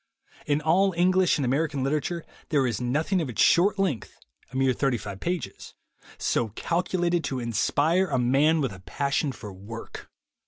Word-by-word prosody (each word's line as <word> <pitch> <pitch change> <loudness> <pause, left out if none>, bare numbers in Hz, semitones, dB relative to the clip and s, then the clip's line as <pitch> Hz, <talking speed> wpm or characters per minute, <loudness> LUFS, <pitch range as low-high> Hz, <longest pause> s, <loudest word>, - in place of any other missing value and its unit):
In 145 0 +1
all 185 +5 +3
English 185 0 +3
and 140 - -1
American 140 +1 0
literature 155 +4 -1 0.2
there 140 -4 +2
is 120 -1 -2
nothing 155 +9 0
of 150 - -3
its 120 - -7
short 195 +4 +4
length 180 - -2 0.2
— - - -34
a - - -11
mere 130 -1 +2
thirty 135 -1 0
five 100 -2 -7
pages 175 -6 -4 0.2
— - - -22
so 115 - 0
calculated 175 -1 0
to 130 - -2
inspire 145 - +1
a 135 - 0
man 140 +6 +3
with 130 -7 -1
a 95 - -11
passion 140 +7 -1
for 105 -6 -9
work. 105 +5 -9
145 Hz, 175 wpm, -26 LUFS, 125-170 Hz, 0.2 s, short